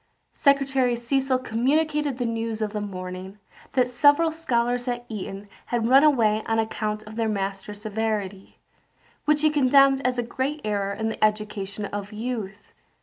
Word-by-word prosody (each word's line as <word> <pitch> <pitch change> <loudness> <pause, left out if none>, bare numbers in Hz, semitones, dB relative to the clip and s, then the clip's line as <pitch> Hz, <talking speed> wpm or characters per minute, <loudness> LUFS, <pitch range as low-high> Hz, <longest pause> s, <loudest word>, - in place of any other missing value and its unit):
Secretary 270 -3 +2
Cecil 260 +2 0
communicated 285 +4 0
the 245 - -1
news 230 -1 -2
of 215 -1 -2
the 210 - -2
morning, 185 0 -7 0.4
that 255 -2 +3
several 290 +6 +4
scholars 245 -6 -1
at 240 -1 -3
Eton 200 -2 -6 0.2
had 235 -2 0
run 270 +3 +6
away 225 -8 +3
on 225 - +1
account 215 -1 -2
of 215 +1 -11
their 225 -1 0
master's 200 +1 -4
severity, 210 -3 -3 0.7
which 300 0 +3
he 310 - +5
condemned 275 -1 +5
as 250 0 0
a 240 - 0
great 265 +5 -3
error 200 -2 -1
in 220 +2 -2
the 220 - -3
education 210 -1 -1
of 205 0 -5
youth. 215 -2 -5
230 Hz, 155 wpm, -25 LUFS, 210-265 Hz, 0.7 s, run